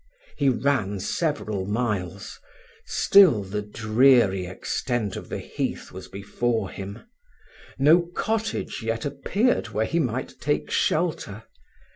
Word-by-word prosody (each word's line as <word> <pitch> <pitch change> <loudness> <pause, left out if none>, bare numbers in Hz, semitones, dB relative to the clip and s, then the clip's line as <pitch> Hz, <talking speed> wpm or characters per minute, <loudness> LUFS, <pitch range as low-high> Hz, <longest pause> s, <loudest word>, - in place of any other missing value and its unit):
He 140 -2 +2
ran 120 -7 0
several 105 - -2
miles, 105 -4 -3 0.5
still 180 - +5
the 100 +2 -3
dreary 110 -2 +3
extent 105 +3 -2
of - - -8
the - - -3
heath - - -4
was 95 0 -9
before 100 +1 -2
him: 100 +3 -8 0.7
no 160 +5 +5
cottage 220 - -2
yet 115 0 -2
appeared 195 - 0
where 110 +1 0
he 170 - 0
might 130 -4 -3
take - - -1
shelter. - - 0
115 Hz, 115 wpm, -25 LUFS, 100-140 Hz, 0.7 s, still